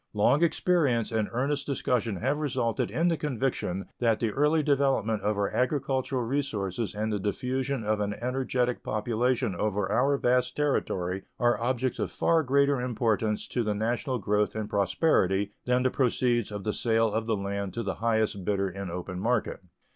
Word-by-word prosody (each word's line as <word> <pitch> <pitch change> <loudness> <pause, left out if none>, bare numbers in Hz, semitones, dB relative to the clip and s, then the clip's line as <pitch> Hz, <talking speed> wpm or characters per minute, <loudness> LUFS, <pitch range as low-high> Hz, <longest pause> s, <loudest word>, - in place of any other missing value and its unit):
Long 125 +8 +3
experience 155 -10 +2
and 110 -2 0
earnest 140 +4 -1
discussion 125 -6 0
have 135 +10 -1
resulted 120 -6 -1
in 165 +2 +1
the 165 - +1
conviction 125 - -2
that 115 -3 +2
the 115 -2 0
early 150 +5 +2
development 135 -7 +1
of 105 +1 0
our 100 -1 0
agricultural 130 -1 0
resources 115 -6 -2
and 110 +1 -1
the 105 - -1
diffusion 130 +5 -2
of 105 0 0
an 105 0 -1
energetic 125 0 -1
population 120 +1 0
over 100 -1 -1
our 140 +5 +3
vast 125 0 +1
territory 95 -10 -1 0.2
are 120 -1 +2
objects 125 +1 -1
of - - -2
far 165 -1 +2
greater 140 -1 +2
importance 110 -3 0
to 125 - -1
the 105 -1 -1
national 120 +5 -1
growth 105 0 0
and 110 -1 -4
prosperity 100 - +2
than 125 0 +2
the 130 - +2
proceeds 120 -3 +1
of 105 -1 -5
the 105 - -1
sale 115 -1 +1
of 110 +1 -1
the 110 -2 +1
land 100 0 -3
to 115 - -2
the 95 -2 -2
highest 110 -4 +1
bidder 100 0 0
in 100 0 -6
open 90 +1 -5
market. 115 +3 0
115 Hz, 170 wpm, -28 LUFS, 105-130 Hz, 0.2 s, Long